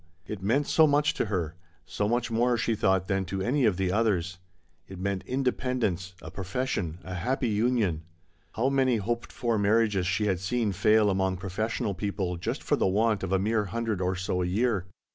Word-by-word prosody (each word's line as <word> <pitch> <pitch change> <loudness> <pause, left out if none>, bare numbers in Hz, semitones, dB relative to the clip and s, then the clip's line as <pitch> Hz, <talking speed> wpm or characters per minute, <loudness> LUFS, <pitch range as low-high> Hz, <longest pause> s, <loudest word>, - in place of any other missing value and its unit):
It 105 -2 -6
meant 125 +9 +1
so 160 +2 +5
much 145 0 +3
to - - -1
her, 90 -7 -2 0.3
so 105 0 -2
much 120 0 0
more 120 +2 +2
she 115 0 0
thought 95 -3 +1
than 95 0 0
to 95 +1 -3
any 130 +4 +2
of 100 -5 +2
the 95 -2 0
others. 95 -4 0 0.5
It 95 - -9
meant 95 0 -2
independ 130 -1 -1
ence, 90 -1 -2
a - - -8
profession, 95 -4 -3
a 90 - -7
happy 120 +8 -1
union. 105 -6 +1 0.5
How 125 +4 +1
many 130 -3 +2
hoped 115 +3 -3
for 115 -3 -1
marriages 100 -2 +2
she 95 +4 +1
had 95 -4 +1
seen 105 +3 0
fail 105 +2 +3
among 95 -1 0
professional 105 +4 -2
people 95 -1 -2
just 85 - -3
for - - +2
the - - +2
want 105 +2 +2
of 95 - -3
a 95 - +4
mere 105 +2 +1
hundred 110 -1 -2
or 90 +1 0
so 95 -1 -1
a 90 - 0
year. 100 -1 0
105 Hz, 200 wpm, -28 LUFS, 95-115 Hz, 0.5 s, so